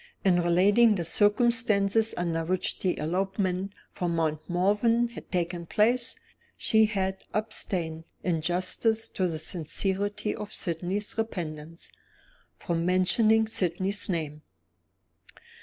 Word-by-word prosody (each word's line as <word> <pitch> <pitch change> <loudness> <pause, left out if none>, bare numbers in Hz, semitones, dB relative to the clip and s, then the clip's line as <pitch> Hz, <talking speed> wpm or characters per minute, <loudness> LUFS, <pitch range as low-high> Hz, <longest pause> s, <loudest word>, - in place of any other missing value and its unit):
In 180 -2 +4
relating 200 +6 +4
the 175 - -2
circumstances 215 +1 +2
under 165 -2 -1
which 185 +2 -1
the 185 - 0
elopement 190 +3 -1 0.2
from 175 -2 -2
Mount 155 -2 0
Morven 210 +6 +2
had 235 - -11
taken 175 -1 -2
place, 235 +5 +1 0.4
she 220 -1 +4
had 190 -3 -2
abstained, 180 -7 -3 0.2
in 170 -3 0
justice 185 +7 +1
to 185 - -1
the 165 -2 -3
sincerity 190 +6 -3
of 210 - -7
Sydney's 185 +4 -2
repentance, 165 -6 -5 0.6
from 170 -1 -2
mentioning 215 +5 +3
Sydney's 190 -1 -1
name. 155 -4 -3
185 Hz, 110 wpm, -27 LUFS, 170-210 Hz, 0.6 s, In